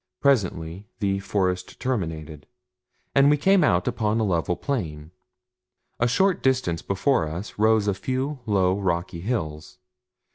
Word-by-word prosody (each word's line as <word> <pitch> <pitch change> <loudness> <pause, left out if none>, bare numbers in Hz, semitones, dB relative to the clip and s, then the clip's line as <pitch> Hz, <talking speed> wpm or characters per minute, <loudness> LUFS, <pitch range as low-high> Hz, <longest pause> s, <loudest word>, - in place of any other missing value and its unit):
Presently 95 - 0
the 100 -2 0
forest 90 -2 -2
terminated, 80 - -3 0.7
and 140 +1 +5
we 150 - +4
came 190 +4 +4
out 90 -11 +2
upon 110 +1 0
a - - +1
level 90 -3 0
plain. 80 - -4 0.9
A 120 - +3
short 190 +9 +2
distance 125 -11 +1
before 100 - +1
us 90 +7 -7
rose 110 -1 +3
a 100 - +2
few 130 +8 -3
low, 95 -2 +2
rocky 85 -3 -2
hills. 80 -8 -4
100 Hz, 135 wpm, -24 LUFS, 85-130 Hz, 0.9 s, and